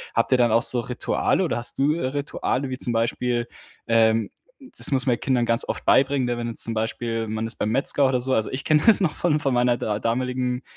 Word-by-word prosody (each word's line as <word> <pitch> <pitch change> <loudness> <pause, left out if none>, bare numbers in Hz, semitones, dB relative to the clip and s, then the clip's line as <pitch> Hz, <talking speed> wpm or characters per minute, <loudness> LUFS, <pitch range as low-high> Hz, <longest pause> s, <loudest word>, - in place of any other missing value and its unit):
Habt 115 - +1
ihr 130 - +5
dann 120 -2 +2
auch 115 - +4
so 125 - +3
Rituale 125 +9 -1
oder 160 -9 -1
hast 120 - -1
du 145 +2 +2
Rituale 140 -2 -3
wie 130 - -5
zum 125 -2 -1
Beispiel, 120 +1 -1 0.4
ähm 110 -2 +2 0.5
das - - +3
muss 130 -2 +2
man 125 -3 +2
den - - -16
Kindern 125 -3 +1
ganz 115 0 +2
oft - - -4
beibringen, 135 -1 +2
wenn 120 0 -4
jetzt 115 - -1
zum 115 - -3
Beispiel 115 0 -3
man 110 +1 -3
ist 115 - -5
beim 105 - -2
Metzger 135 +3 +1
oder 130 -1 0
so. 130 +1 -1
Also 110 - 0
ich 130 +1 -4
kenne 150 -1 +3
das 225 - +7
noch 165 -5 0
von 155 -3 0
von 135 -3 0
meiner 120 0 +2
da 105 -3 -3
damaligen 125 +2 -2
125 Hz, 235 wpm, -23 LUFS, 115-135 Hz, 0.5 s, das